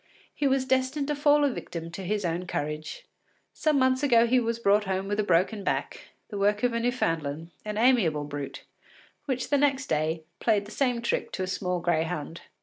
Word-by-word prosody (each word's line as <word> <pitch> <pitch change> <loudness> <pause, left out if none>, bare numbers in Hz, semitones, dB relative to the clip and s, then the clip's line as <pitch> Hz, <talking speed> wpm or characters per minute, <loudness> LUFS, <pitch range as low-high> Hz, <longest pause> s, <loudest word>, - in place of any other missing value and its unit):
he 285 - 0
was 265 -1 +2
destined 260 +2 0
to 295 - 0
fall 290 0 +4
a 285 - +4
victim 170 -7 -6
to 185 - -7
his 205 +1 -1
own 175 +2 -2
courage. 150 - -4 0.5
Some 310 -2 +1
months 260 0 +3
ago 240 -5 +5
he 250 +2 +3
was 230 -1 -1
brought 210 -2 +3
home 190 0 -2
with 205 +1 -1
a - - +3
broken 195 +3 +1
back, - - -3 0.2
the 205 - -5
work 205 +2 +2
of 245 -1 +2
a 230 - 0
Newfoundland, 165 - -1
an 210 0 -4
amiable 215 - +3
brute, 145 -1 -6 0.6
which 260 -1 -2
the 285 - +4
next 275 -1 +2
day 160 -2 -1 0.2
played 210 -3 +2
the 210 - -11
same 245 -3 0
trick 235 - -1
to 190 - -2
a - - 0
small 180 -1 -2
greyhound. 165 -1 -1
210 Hz, 200 wpm, -27 LUFS, 170-260 Hz, 0.6 s, ago